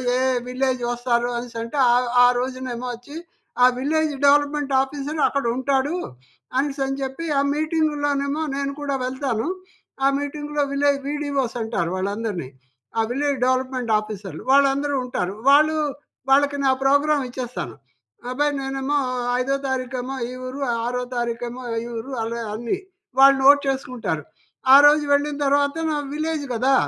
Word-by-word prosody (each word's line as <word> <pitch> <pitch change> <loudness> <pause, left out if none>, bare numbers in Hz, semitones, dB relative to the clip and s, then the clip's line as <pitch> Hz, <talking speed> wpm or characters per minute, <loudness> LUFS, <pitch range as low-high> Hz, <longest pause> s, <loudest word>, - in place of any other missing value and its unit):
ఏ - - +1 0.3
village 255 0 -1
వస్తారు 240 0 0
అనేసి 235 -1 -5
అంటే 230 +5 -6 0.2
ఆహ్, 245 0 +2
ఆ - - +8
రోజునేమో 255 -1 -4
వచ్చి 245 +5 -11 0.5
ఆ - - +9
విలేజ్ 310 +2 +1
డెవలప్మెంట్ 290 -1 +2
ఆఫీసర్ 285 +2 -3
అక్కడ 280 -3 -2
ఉంటాడు 270 +3 0 0.6
అనేసి 275 0 -1
అని 270 +1 -3
చెప్పి 270 +5 -4
ఆ - - +2
మీటింగ్‌లో 305 -2 0
నేమో 280 +3 -1
నేను 280 0 -2
కూడా 280 -1 -1
వెళ్తాను. 260 -2 -2 0.6
ఆ - - +7
మీటింగ్‌లో 295 +1 -3
విలేజ్ 280 0 +2
వీడిఓస్ 285 -4 -2
అంటారు 220 -7 -1
వాళ్ళందరిని. 200 - -3 0.5
ఆ - - +4
విలేజ్ 280 0 0
డెవలప్మెంట్ 255 -2 0
ఆఫీసర్లు 210 -3 -8
వాళ్ళందరూ 280 +1 +3
ఉంటారు. 195 -5 -3
వాళ్ళు, 305 +2 +5 0.5
వాళ్ళకి 285 +1 +4
నా 265 - +5
ప్రోగ్రామ్ 285 +1 +3
ఇచ్చేస్తాను. 245 - -5 0.5
అబ్బాయి 290 +3 0
నేనేమో 270 +2 -1 0.4
ఐదో 270 +2 0
తారీఖేమో 260 0 -3
ఈ - - -8 0.2
ఊరు, 255 +2 -6 0.2
ఆరో 250 +1 -1
తారీఖేమో 240 +1 -3 0.2
ఈ 235 - -6
ఊరు 265 +5 -6
అలవా 230 +1 -3
అన్ని 235 - -2 0.4
వాళ్ళు 275 +1 +8
నోట్ 285 +1 +8
చేసుకుంటారు. 250 - -2 0.5
ఆ - - +12
రోజు 295 +1 +6
వెళ్ళిన 290 +1 +1
తర్వాత 285 +1 +2 0.2
నా 300 - 0 0.2
విలేజ్ 310 -1 -2
కదా! 255 +4 +2
270 Hz, 140 wpm, -22 LUFS, 245-285 Hz, 0.6 s, ఆ